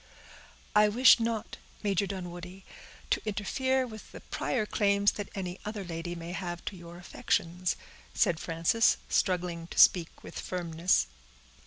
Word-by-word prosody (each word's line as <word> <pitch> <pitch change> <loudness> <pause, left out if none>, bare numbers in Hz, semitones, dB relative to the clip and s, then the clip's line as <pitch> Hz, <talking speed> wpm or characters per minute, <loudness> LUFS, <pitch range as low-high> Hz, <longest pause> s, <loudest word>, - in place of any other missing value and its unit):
"I 210 0 +6
wish 245 +4 +7
not, 230 -1 -2 0.3
Major 200 -1 +1
Dunwoodie, 180 0 -7 0.5
to - - +2
interfere 260 +5 0
with 220 -3 -10
the - - -10
prior 230 -5 -2
claims 200 -1 +2
that 205 -2 -6
any 185 -1 -4
other 210 -1 -5
lady 175 0 -5
may 170 0 -7
have 175 -2 -5
to 200 - -4
your 170 -1 -11
affections," 175 0 -1 0.4
said 175 -7 +2
Frances, 165 +8 +2
struggling 175 -3 0
to - - -10
speak 170 -3 +5
with - - -8
firmness. 170 - +1
185 Hz, 140 wpm, -30 LUFS, 175-210 Hz, 0.5 s, wish